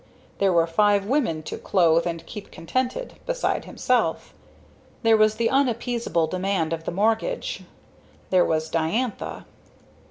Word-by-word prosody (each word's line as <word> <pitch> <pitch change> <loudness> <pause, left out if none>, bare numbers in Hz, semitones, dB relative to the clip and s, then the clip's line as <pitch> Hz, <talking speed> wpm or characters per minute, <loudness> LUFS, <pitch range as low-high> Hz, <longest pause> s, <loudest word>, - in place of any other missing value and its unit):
There 195 -1 +3
were 170 -2 +4
five 200 +4 +2
women 225 - 0
to - - -6
clothe 170 -3 +3
and 165 -1 -4
keep 210 -3 -9
contented, 255 - -3
beside - - -1
himself. - - 0 0.7
There 225 -1 +5
was 215 0 +4
the 230 +1 +1
unappeasable 240 -9 +1
demand 185 -1 -1
of 165 0 -5
the - - -2
mortgage 225 - 0
and - - -17 0.6
there 185 -1 +5
was 160 0 0
Diantha. 200 +10 -2
200 Hz, 135 wpm, -24 LUFS, 165-235 Hz, 0.7 s, There